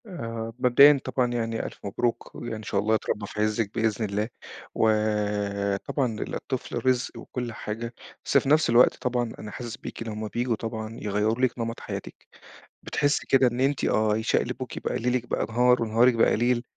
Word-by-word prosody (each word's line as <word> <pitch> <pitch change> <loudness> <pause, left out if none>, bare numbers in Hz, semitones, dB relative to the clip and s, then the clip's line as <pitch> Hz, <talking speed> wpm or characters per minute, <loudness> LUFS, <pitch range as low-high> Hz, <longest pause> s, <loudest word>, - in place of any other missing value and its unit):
آآ 115 - -5
مبدئيًا 140 +3 +7
طبعًا 125 -2 0
يعني 115 -1 -2
ألف - - -8
مبروك، 115 +4 -2
وإن 110 -2 -6
شاء - - -1
الله 110 +2 +2
يتربّى 105 -1 -2
في 105 - -4
عزِّك 110 -1 0
بإذن 110 -1 0
الله، 105 +2 -2 0.5
وطبعًا 105 +2 0
الطفل 125 -2 -4
رزق 130 -1 +1
وكل 125 -2 -5
حاجة، 115 +3 -5 0.3
بس - - +3
في - - +1
نَفس 155 -1 +4
الوقت 120 +2 +6
طبعًا 125 -2 -2
أنا 105 - -7
حاسس 120 -2 -6
بيكِ - - -7
لمّا 110 -1 -4
بييجوا 120 +2 -1
طبعًا 110 0 -5
يغيَّروا 105 +3 0
لِك 125 -1 -3
نمَط 115 0 -3
حياتِك، - - -8 0.6
بتحسّي 145 +1 0
كده 135 -1 +5
إن 120 0 -2
أنتِ 140 0 +1
آه 110 -1 +2
يشقلبوكِ 110 - -1
بقى، - - -2
ليلِك 125 +1 0
بقى - - -1
نهار، 125 +1 +3
ونهارِك 115 +3 +4
بقي 115 - +4
ليل، 120 +1 +1
115 Hz, 170 wpm, -26 LUFS, 110-125 Hz, 0.6 s, مبدئيًا